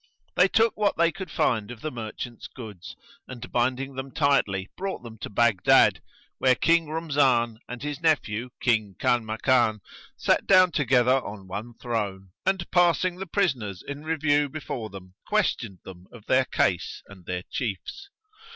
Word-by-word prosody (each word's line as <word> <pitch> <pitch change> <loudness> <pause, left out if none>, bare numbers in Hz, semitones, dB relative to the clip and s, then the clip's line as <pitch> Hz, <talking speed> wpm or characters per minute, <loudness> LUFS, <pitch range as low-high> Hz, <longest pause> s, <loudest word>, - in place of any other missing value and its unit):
[FN#115] - - -43
They 180 - +6
took 225 +3 +2
what 210 -1 +1
they 170 0 +4
could 190 -1 -7
find 110 -7 0
of 120 -2 -9
the 155 - -3
merchant's 115 0 -7
goods 105 -8 -10 0.3
and, 125 -2 -9
binding 130 +3 0
them 130 +1 -6
tightly, 115 -11 +1
brought 190 -7 -4
them 110 -2 -10
to - - -6
Baghdad, 105 -2 +4 0.4
where 130 -1 +4
King 165 +4 +3
Rumzan 135 -8 +1
and 125 +2 -7
his 150 +1 -4
nephew, 125 -8 +1
King 110 -5 +1
Kanmakan, 115 0 +2 0.4
sat - - +1
down 185 -2 +6
together 130 -3 +3
on 100 -2 -8
one 110 +5 -6
throne 105 -5 -4 0.2
and, 190 -2 +1
passing 175 0 +3
the 195 +1 -6
prisoners 130 - -1
in 145 +1 -6
review 145 -2 +1
before 130 -6 -5
them, 95 -2 -11
questioned 95 - 0
them 90 -1 -12
of 115 -3 -14
their 130 0 +3
case 90 -7 -1
and 95 -3 -15
their 90 -1 -3
chiefs. 125 - -4
125 Hz, 160 wpm, -26 LUFS, 110-155 Hz, 0.4 s, They